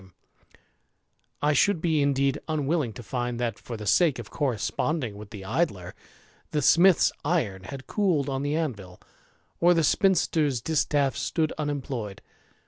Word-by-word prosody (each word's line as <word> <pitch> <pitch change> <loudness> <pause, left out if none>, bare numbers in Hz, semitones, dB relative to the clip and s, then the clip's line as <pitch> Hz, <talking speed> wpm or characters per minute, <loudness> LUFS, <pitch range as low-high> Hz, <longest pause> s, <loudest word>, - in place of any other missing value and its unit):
THE 95 - -17
IDLER, - - -22 1.3
281 150 - +2
I - - +2
should 175 +5 +3
be 160 -2 +1
indeed 140 0 +1
unwilling 155 -4 0
to 120 - -9
find 120 0 -3
that, 115 -3 -2
for 115 - -7
the 105 - -7
sake 150 - +3
of 120 -3 -9
corresponding 130 -1 -1
with 105 0 -10
the 100 -2 -9
Idler^ 100 - -2 0.6
the 150 -2 -1
smith's 175 +5 +5
iron 115 - -1
had 130 +6 -8
cooled 180 -10 +1
on 135 -1 -2
the 145 +1 -1
anvil, 105 - -4 0.6
or 175 +1 +5
the 165 - +2
spinster's 155 - +2
distaff 145 0 +1
stood 160 -2 -1
unemployed. 135 -9 -4
140 Hz, 155 wpm, -26 LUFS, 115-155 Hz, 1.3 s, smith's